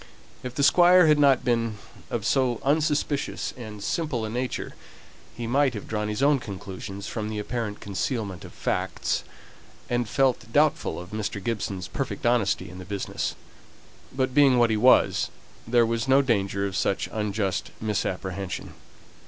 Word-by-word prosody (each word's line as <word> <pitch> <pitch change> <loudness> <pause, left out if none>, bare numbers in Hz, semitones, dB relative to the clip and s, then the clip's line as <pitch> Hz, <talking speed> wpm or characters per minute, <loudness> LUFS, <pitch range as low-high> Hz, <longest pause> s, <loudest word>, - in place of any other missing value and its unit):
If 125 -1 -6
the 140 - +1
Squire 180 +3 +7
had 150 -1 +5
not 140 -4 +4
been 115 -3 0 0.3
of 110 -3 -3
so 125 -2 +2
unsuspicious 150 0 0
and 110 -5 -8
simple 125 -1 -1
a 110 - -4
nature, 125 +2 -3 0.6
he 120 - -4
might 130 +1 +2
have 105 - -6
drawn 105 -1 -2
his 105 +5 -2
own 145 -1 +4
conclusions 100 -2 -7
from 110 -2 -4
the 110 - -4
apparent 105 0 -3
concealment 100 -2 -3
of - - -10
facts, - - -2 0.7
and 120 -2 0
felt 130 -4 +1
doubtful 150 - +2
of 90 +2 -10
Mr. 105 -1 -3
Gibson's 100 -5 -3
perfect - - -4
honesty 120 -4 +2
in 90 +1 -10
the - - -7
business; 100 +1 -3 0.8
but 130 -1 -1
being 135 -2 +5
what 120 -1 +4
he - - +2
was, 125 +4 +4 0.4
there 120 0 +4
was 115 +2 -1
no 135 +1 +5
danger 100 -5 0
of 95 -1 -4
such 100 - 0
unjust 100 -4 -1
misapprehension. 95 -3 -3
115 Hz, 155 wpm, -26 LUFS, 100-130 Hz, 0.8 s, Squire